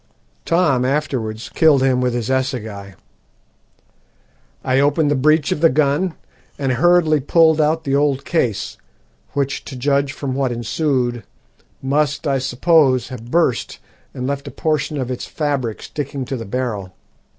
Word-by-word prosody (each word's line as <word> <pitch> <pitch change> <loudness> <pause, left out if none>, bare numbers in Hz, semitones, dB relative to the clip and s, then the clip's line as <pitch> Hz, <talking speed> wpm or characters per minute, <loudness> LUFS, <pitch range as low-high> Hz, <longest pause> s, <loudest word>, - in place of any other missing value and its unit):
Tom 160 -7 +2
afterwards 125 -5 -2
killed 150 -5 +4
him 130 -1 +2
with 125 -1 0
his 120 +1 -2
assegai. 110 -7 -3 1.7
I 130 +1 +2
opened 145 +1 +2
the - - +2
breech 155 +2 +2
of 150 - -1
the 165 - +6
gun 155 +5 +1 0.4
and 135 -2 -1
hurriedly 160 +3 +3
pulled 160 +2 +4
out 160 +2 +1
the 140 -2 0
old 140 -1 +1
case, 120 - -1 0.6
which, 140 -1 -2
to 135 - -8
judge 140 +2 +1
from 140 -2 -4
what 135 -1 0
ensued, 120 0 -1 0.6
must, 145 +2 0
I 135 -2 +1
suppose, 135 -1 +2
have 120 -2 -9
burst 165 -5 0 0.3
and 125 - -5
left 140 +1 -3
a - - -6
portion 150 -1 -1
of 130 -2 -3
its 125 - -5
fabric 140 -7 -2
sticking 140 -2 -5
to 135 - -4
the 115 -3 -6
barrel. 105 -5 -3
140 Hz, 150 wpm, -19 LUFS, 125-150 Hz, 1.7 s, the